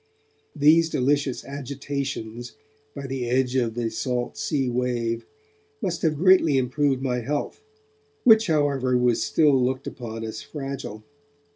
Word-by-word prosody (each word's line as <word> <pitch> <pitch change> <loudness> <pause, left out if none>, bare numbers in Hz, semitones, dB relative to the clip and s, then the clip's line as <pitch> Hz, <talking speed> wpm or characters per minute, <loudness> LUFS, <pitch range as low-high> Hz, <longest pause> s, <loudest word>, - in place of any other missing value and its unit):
These 160 +3 +5
delicious 140 -1 0
agitations 135 -4 -5 0.4
by 140 -1 -6
the 130 -3 -3
edge 130 0 +1
of 120 -3 0
the 115 -2 -2
salt 125 +1 -2
sea 135 -4 -1
wave 120 -2 -1 0.5
must 180 -7 -2
have 155 -2 +1
greatly 175 -4 +5
improved 135 +1 0
my 125 -2 0
health, 145 - -3 0.6
which 220 -2 +6
however 140 -5 +2
was 125 -2 +2
still 145 -5 +3
looked 130 +1 -1
upon 115 -2 -6
as 110 -1 -5
fragile. 135 -7 -6
130 Hz, 130 wpm, -24 LUFS, 120-145 Hz, 0.6 s, which